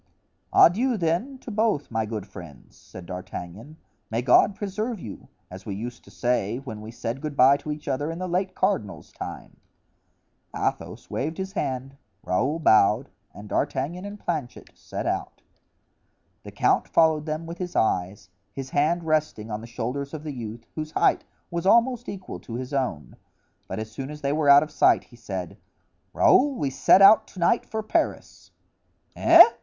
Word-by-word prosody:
"Adieu, 235 +8 +5
then, 180 +10 -1
to 250 - -9
both, 215 - 0
my 110 -1 -1
good 105 -3 -5
friends," 85 - -13
said 90 - -12
D'Artagnan; 90 - -8 0.3
"may 115 +2 -1
God 135 +10 +5
preserve 215 +3 -3
you! 105 - -9 0.2
as 95 +2 -9
we 100 - -3
used 120 +4 -7
to - - -15
say 120 -3 -1
when 120 -6 -8
we 110 - -9
said 115 +2 -5
good 150 -2 -5
bye 130 +2 +7
to 150 - -6
each 150 0 -7
other 145 +4 -1
in 165 - -5
the 185 +1 -4
late 185 +2 -1
cardinal's 185 - -1
time." - - -8 1.0
Athos - - -3
waved 160 +4 -2
his 190 0 -4
hand, 135 -6 -3 0.3
Raoul 130 - 0
bowed, 110 -3 +4 0.2
and 105 +1 -11
D'Artagnan 145 - -2
and 205 +1 -8
Planchet 145 -10 -4
set - - -7
out. - - -3 1.0
The - - -10
count - - +2
followed 160 -1 +3
them 155 +2 -3
with 170 +1 -8
his 180 -1 -5
eyes, 90 -2 0 0.2
his 135 -1 -7
hands 160 +4 +1
resting 155 -9 -1
on 105 +1 -4
the 115 - -9
shoulders 125 +5 -4
of 150 - -8
the 150 -2 -5
youth, 115 -2 -7
whose 155 0 -5
height - - +2 0.3
was 170 +2 -2
almost 235 +3 +3
equal 190 -2 -7
to 115 - -8
his 130 +3 -5
own; 130 - -3 0.5
but - - -5
as 110 0 -5
soon 135 +4 -6
as 150 0 -9
they 140 0 0
were 150 -1 +2
out 140 +1 +8
of 155 - -8
sight - - +4
he 120 - -19
said: 95 -6 -6 0.5
"Raoul, 280 +1 +4
we 140 - -2
set 185 +8 +5
out 215 +3 +7
to 185 - -12
night 175 +7 +2
for 220 0 -4
Paris." 215 - -2 0.7
"Eh?" - - +9
140 Hz, 175 wpm, -25 LUFS, 115-175 Hz, 1.0 s, Eh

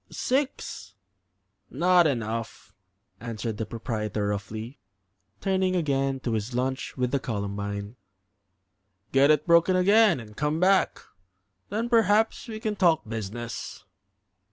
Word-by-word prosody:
"Six." 250 - -2 0.7
"Not 175 +5 +4
enough," 115 -5 -4 0.5
answered 115 -1 -4
the 110 - -3
proprietor, 110 -3 -3
roughly, 110 +5 -5 0.6
turning 190 -1 +1
again 135 -5 0
to 120 - -2
his 110 +3 -3
lunch 130 +2 -2
with 125 -1 0
the 140 - +1
Columbine. 100 -1 -4 1.1
"Get 135 +2 +5
it 150 -1 +3
broken 170 +2 +4
again 200 - +5
and 105 -2 -11
come 150 +4 -1
back; 190 +2 +3 0.7
then 220 +4 -1
perhaps 225 -1 +2
we 220 -2 -6
can 215 -2 -2
talk 170 - +2
business." 115 +2 -6
130 Hz, 115 wpm, -26 LUFS, 110-185 Hz, 1.1 s, Get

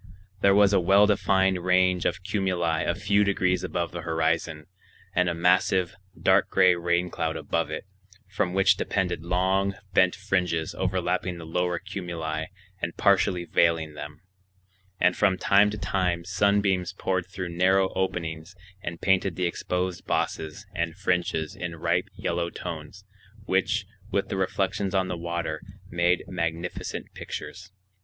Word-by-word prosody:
There 100 0 +5
was 100 0 +5
a 100 - +5
well 95 +3 +5
defined 95 -3 +2
range 90 -1 +3
of 90 +1 -3
cumuli 90 -4 0
a 85 - +1
few 100 +1 +2
degrees 95 -2 +1
above 85 -1 -2
the 85 - -5
horizon, 80 -1 -1 0.5
and 90 -1 +2
a 85 - -2
massive, 90 +1 +2 0.3
dark - - +3
gray 95 -1 +5
rain 85 0 0
cloud 80 0 -2
above 85 +1 -1
it, 80 - -5 0.4
from 95 -1 -1
which 95 0 +4
depended 90 -4 -1
long, 95 +3 +1 0.2
bent 90 -1 +4
fringes 90 -5 -1
overlapping 90 -1 -1
the 85 - -8
lower 90 +2 -1
cumuli 80 -3 -4 0.3
and 85 - -3
partially 95 -2 +3
veiling 80 -2 +2
them; 75 +1 -9 0.8
and 90 - +3
from 95 -3 +2
time 100 +2 +4
to 105 - -5
time 90 -4 -1
sunbeams 95 -1 +1
poured 95 -2 -1
through 90 -1 -5
narrow 95 +2 +2
openings 85 -2 -3 0.3
and 85 -3 -6
painted 95 -2 +2
the 90 - -1
exposed 90 +1 -2
bosses 80 +6 -2
and 85 -1 -2
fringes 90 -5 -1
in 90 -2 -5
ripe 80 - 0
yellow 85 0 -2
tones, 85 +3 -7 0.4
which, 100 +2 +1 0.2
with 100 -3 -1
the - - -2
reflections 95 +1 -1
on 95 -1 +1
the 90 - -2
water, 85 -2 -3 0.3
made 85 +1 +2
magnificent 85 -1 -4
pictures. 95 - -7
90 Hz, 145 wpm, -26 LUFS, 85-95 Hz, 0.8 s, There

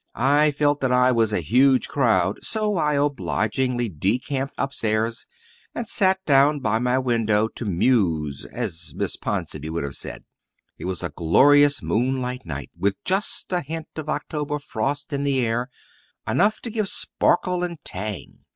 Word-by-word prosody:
I 145 +5 +4
felt 145 0 +1
that 130 -2 +1
I 125 0 +4
was 115 -3 +2
a 95 - 0
huge 130 - +3
crowd, 105 -9 +1
so 215 -2 -1
I 150 -2 +1
obligingly 120 - 0
decamped 125 - -2
upstairs 115 -4 -1 0.5
and 235 - -4
sat 190 -2 +1
down 145 +1 +4
by 110 -4 0
my 125 +1 +1
window 115 -4 +1
to 120 - -7
"muse," 85 - +1
as 90 -9 -4
Miss - - -1
Ponsonby 75 +1 -4
would 85 0 -2
have 70 -1 -4
said. - - -7 0.6
It - - -6
was 90 -1 -3
a 85 - -2
glorious 145 - +5
moonlight 125 -2 -1
night, 70 -3 -6
with 100 0 0
just 190 0 -1
a 180 - +1
hint 160 +2 -6
of 155 -1 -6
October 150 -1 -2
frost 145 +3 -3
in 140 0 -1
the 140 -2 +1
air 120 +2 -1 0.6
enough 215 +2 +2
to 235 - -4
give 215 -2 -1
sparkle 180 -1 0
and 175 -1 -3
tang. 100 +1 -5
130 Hz, 160 wpm, -23 LUFS, 105-145 Hz, 0.6 s, glorious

